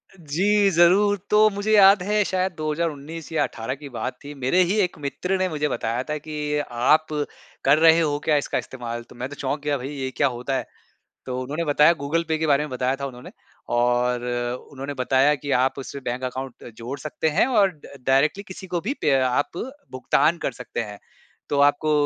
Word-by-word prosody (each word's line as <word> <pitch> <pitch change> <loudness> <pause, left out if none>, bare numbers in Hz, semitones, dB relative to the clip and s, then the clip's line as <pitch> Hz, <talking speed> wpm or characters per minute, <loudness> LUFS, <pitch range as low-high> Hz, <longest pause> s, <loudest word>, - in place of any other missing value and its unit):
जी 195 +5 +2
ज़रूर। 190 +4 +4
तो 215 +1 +6
मुझे 205 +1 -2
याद 195 -1 +7
है 210 +1 +2
शायद 185 0 0
2019 155 0 -3
या 160 - +2
18 115 +4 -4
की 145 0 -10
बात 120 - -4
थी। 145 - -8
मेरे 135 +8 +2
ही 180 +4 0
एक 180 -3 -1
मित्र 180 +7 -2
ने 185 0 +1
मुझे 150 -1 -1
बताया 115 +2 -2
था 150 - -1
कि 150 +1 -8 0.3
आप 125 +6 +3 0.6
कर - - +6
रहे 160 +1 +6
हो 150 -3 +1
क्या 155 - +3
इसका 145 - -1
इस्तेमाल? 120 -2 -5
तो - - -17
मैं 125 +3 -5
तो 145 - -8
चौंक 140 +2 -2
गया 145 -1 0
भई 130 +1 -6
ये 135 -1 -3
क्या 140 - +4
होता 135 +2 -2
है? - - -4 0.6
तो 125 -1 -3
उन्होंने 145 +6 -3
बताया 150 +2 +5
गूगल-पे 160 +2 -1
के 160 - 0
बारे 145 -1 +3
में 150 - -7
बताया 130 +1 -1
था 140 - -2
उन्होंने 125 -2 -9 0.4
और 120 0 +1 0.5
उन्होंने 140 +1 -6
बताया 135 +2 +3
कि 145 0 -6
आप 130 +2 +1
उससे 140 +1 -7
बैंक 125 +2 -3
अकाउंट 130 0 -6
जोड़ 125 +4 -6
सकते 155 +3 -2
हैं - - +5
और 210 -7 +4
ड 155 -5 -16 0.2
डायरेक्टली 140 +9 +3
किसी 190 0 -9
को 175 -1 -2
भी 230 +10 -2
पे 145 - +2
आप 130 +6 0 0.4
भुगतान 145 +5 +2
कर 140 - -2
सकते 120 0 -6
हैं। 105 -2 -8 0.5
तो 140 -1 +1
आपको 145 +2 +3
145 Hz, 200 wpm, -23 LUFS, 130-170 Hz, 0.6 s, याद